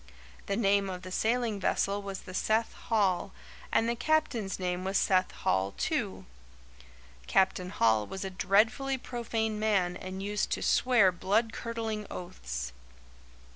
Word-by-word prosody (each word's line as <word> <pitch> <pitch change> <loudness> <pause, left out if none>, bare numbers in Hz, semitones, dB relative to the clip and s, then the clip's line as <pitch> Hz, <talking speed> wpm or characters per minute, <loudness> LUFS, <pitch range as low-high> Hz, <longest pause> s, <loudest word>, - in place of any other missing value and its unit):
The 195 - 0
name 200 -2 +2
of 180 -1 -6
the 185 - -8
sailing 225 +1 0
vessel 200 +1 0
was 195 -1 -6
the 185 - -10
Seth 220 +4 +1
Hall, 200 -6 0 0.4
and 225 - +3
the 235 - 0
captain's 245 -6 0
name 180 -1 -2
was 190 +1 0
Seth 185 -1 +3
Hall, 95 +1 0
too. - - -2 1.0
Captain 185 -1 +2
Hall 110 - +2
was 195 0 -5
a 190 - -4
dreadfully 225 +9 +2
profane 225 -3 -2
man 195 -5 +1
and 185 +1 -6
used 205 +1 -1
to - - -3
swear 240 -7 +4
blood 210 +6 +1
curdling 225 -2 -4
oaths. 65 - -6
200 Hz, 140 wpm, -30 LUFS, 185-225 Hz, 1.0 s, swear